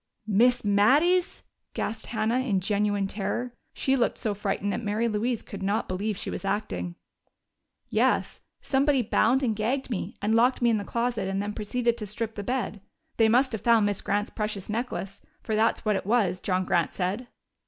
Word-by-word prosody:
"Miss 225 +3 +3
Mattie's?" 290 - +3 0.3
gasped 220 +1 -3
Hannah, 225 +2 0
in 230 -7 +1
genuine 205 +1 0
terror. 210 +5 -3 0.2
She 270 - +1
looked 245 - +1
so 220 -4 -1
frightened 200 0 -2
that - - -3
Mary 215 +3 0
Louise 225 +2 -1
could 200 - -8
not 200 +3 0
believe 200 +2 -2
she - - -4
was - - -5
acting. 195 -3 -2 0.9
"Yes. - - +1 0.2
Somebody 275 -1 +2
bound 240 +5 +2
and 225 -4 +1
gagged 250 +5 -1
me 215 - -3
and 210 +2 0
locked 245 +3 +4
me 240 -1 +3
in 220 - +2
the - - -4
closet 235 -3 -1
and 195 0 -1
then 205 +1 -2
proceeded 235 +3 -1
to 210 - -4
strip 220 +2 -4
the 205 - -5
bed. 225 -2 -2 0.4
They 225 -1 +5
must 255 +4 +3
have 220 -4 -4
found 230 -3 +4
Miss 205 -1 -1
Grant's 205 +1 -1
precious 210 -3 -3
necklace 215 -4 -4 0.2
for 220 - -3
that's 220 +1 +1
what 210 -1 +2
it 190 - -3
was, 205 -5 +2
John 185 -1 0
Grant 170 -2 +1
said." 200 +7 -2
215 Hz, 185 wpm, -27 LUFS, 200-240 Hz, 0.9 s, They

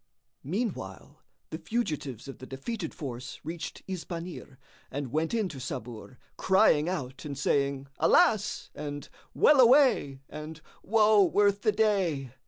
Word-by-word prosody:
Meanwhile, 165 - -4 0.3
the 160 - -5
fugitives 150 - -3
of 135 - -9
the 130 - -10
defeated 165 - -5
force 125 -4 -7
reached 165 +1 -6
Isbanir 175 -6 -6 0.3
and 140 -2 -5
went 160 +3 0
in 225 -4 0
to 140 - -8
Sabur, 120 0 -7 0.2
crying 185 -5 +4
out 135 -8 -5
and 140 -2 -6
saying, 140 -1 0
"Alas!" 220 - +3
and 145 -1 -6 0.3
"Well 295 -2 +5
away!" 245 - +5
and 155 +1 -8 0.2
"Woe 215 -1 +4
worth 200 +2 +2
the 215 - +3
day!" 190 - 0
160 Hz, 130 wpm, -28 LUFS, 135-205 Hz, 0.3 s, Well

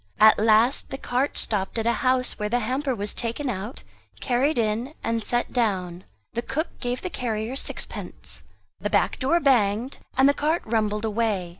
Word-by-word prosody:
At 215 0 +7
last 225 +4 +4
the 270 - -4
cart 260 +2 -1
stopped 200 0 0
at 225 - -1
a 235 - +3
house, 255 -2 +1
where 210 0 -1
the 245 +2 +1
hamper 260 +4 -1
was 205 -1 -1
taken 245 +4 -2
out, 210 +4 -6 0.4
carried 260 +3 +1
in, 230 +6 0
and 230 -1 -1
set 240 +2 0
down. 185 -7 -1 0.3
The 235 - -1
cook 310 +7 -2
gave 245 0 -3
the 365 - -2
carrier 225 -1 -2
sixpence; - - -4 0.4
the - - -2
back - - +1
door 280 +6 +3
banged, 240 -3 +2 0.2
and 265 +1 +6
the 285 - +5
cart 310 +4 0
rumbled 215 -1 0
away. 215 -5 0
235 Hz, 175 wpm, -25 LUFS, 215-260 Hz, 0.4 s, At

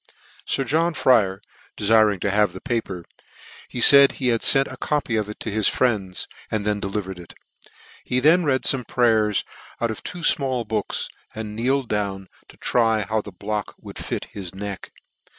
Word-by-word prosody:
Sir 135 - 0
John 160 +6 0
Fryer 100 -8 +2 0.3
defiring 105 -2 +3
to 100 - 0
have 105 +1 +2
the - - -8
paper, 110 - -4 0.6
he 125 - -6
faid 140 +3 +8
he 130 -2 -1
had 115 -1 +1
fcnt 135 -1 +5
a - - -7
copy 145 -6 -1
of 105 -1 -1
it 105 - -8
to 110 - -4
his 110 0 +1
friends, 100 -7 -1 0.2
and 105 -2 -2
then 105 -1 0
delivered 95 -2 -4
it. 85 - -13 0.7
He 125 - 0
then 165 +6 +4
read 135 -4 +1
fome 130 -3 0
prayers 110 -4 +2 0.4
out 115 -1 0
of 110 - -7
two 175 - -7
fmall 130 -7 +1
books, 110 -2 -2 0.3
and 105 -1 -6
kneeled 130 +3 0
down 100 -3 -3 0.2
to - - -18
try 115 -3 +1
how 110 +2 -1
the 105 - -10
block 105 +3 -5
would - - -10
fit - - -4
his 95 -3 -7
neck. 100 0 -7
110 Hz, 180 wpm, -22 LUFS, 100-125 Hz, 0.7 s, faid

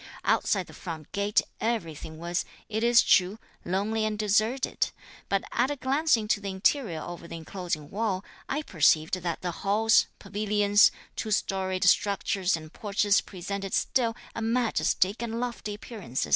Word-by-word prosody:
Outside - - +2
the - - -14
front 160 -4 -8
gate 200 +1 +2 0.2
everything 165 -8 -3
was, 170 +2 -2 0.3
it 220 +1 -1
is 235 0 +6
true, 190 +2 +4 0.3
lonely 205 +5 0
and 215 -1 -1
deserted; 215 +5 +1 0.4
but 195 -1 +1
at 245 +3 +2
a 290 - -1
glance 275 +2 +2
into 215 -1 0
the 200 - -4
interior 190 - 0
over 175 -1 -8
the 170 - -7
enclosing 165 -2 -5
wall, 200 -3 -1 0.2
I 295 +3 -1
perceived 160 - +3
that 170 -1 -3
the 180 - -1
halls, 215 +3 +4
pavilions, 205 0 +3 0.2
two 220 - -3
storied 190 -2 0
structures 195 -1 +2
and 155 0 -11
porches 205 0 +2
presented 195 +1 -4
still 230 -3 +1 0.2
a - - -5
majestic 225 -3 +1
and 230 -1 -3
lofty 235 -4 -4
appearance. 205 - -4
205 Hz, 150 wpm, -28 LUFS, 180-225 Hz, 0.4 s, is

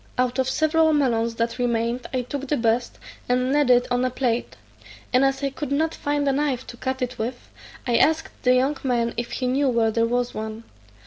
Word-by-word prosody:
Out 250 +1 0
of 260 0 +1
several 315 +3 +3
melons 235 -5 +1
that 230 +2 -2
remained 235 0 -1
I 255 -2 -1
took 280 +2 -5
the 295 - 0
best, 235 +1 0 0.3
and 250 +2 +1
laid 290 -3 +3
it 245 0 +5
on 245 0 +2
a 255 - +2
plate; 245 -2 -1 0.6
and 255 +2 +5
as 270 +1 +1
I 275 - 0
could 280 0 -5
not 315 +3 +1
find 290 0 -1
a - - +4
knife 270 -2 -1
to - - -14
cut 260 +1 -2
it 250 0 -5
with, 245 +3 -5 0.3
I 240 -2 +2
asked 320 +1 +2
the 250 0 +4
young 270 +3 +1
man 235 -3 0
if 240 0 -4
he 255 - -2
knew 265 +2 +2
where 230 -2 +2
there 230 +1 +1
was 245 +1 -1
one. 220 +1 -6
255 Hz, 215 wpm, -23 LUFS, 235-275 Hz, 0.6 s, it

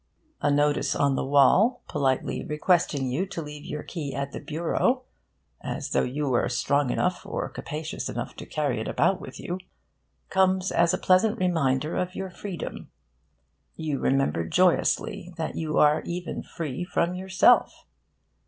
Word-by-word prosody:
A 145 - +2
notice 145 0 +2
on 140 -1 +2
the - - -1
wall, 145 - +4
politely 135 -3 0
requesting 150 -2 +1
you 140 +10 -1
to 190 -3 -6
leave 150 -2 -7
your 150 -2 -5
key 150 -6 -5
at 140 0 -3
the - - -6
bureau 170 - 0 0.6
(as - - -4
though - - +3
you 145 +4 -2
were 125 -3 +1
strong 140 +2 +1
enough 180 +7 0
or - - -3
capacious 155 +1 -5
enough - - -5
to - - -8
carry 145 -7 -1
it - - -4
about 190 -1 +1
with 205 - -9
you) 180 +2 -4 0.7
comes 190 0 +2
as 170 0 +3
a - - -3
pleasant 210 +5 +3
reminder 155 - +1
of 180 +1 -2
your 190 -1 -4
freedom. 180 -2 -6 0.9
You 155 -4 -2
remember 135 -10 +1
joyously 180 - +1
that 160 - -3
you 155 -2 -2
are 150 +1 +5
even 175 0 -4
free 155 -1 -5
from 175 0 0
yourself. 190 +6 +3
160 Hz, 155 wpm, -26 LUFS, 140-185 Hz, 0.9 s, are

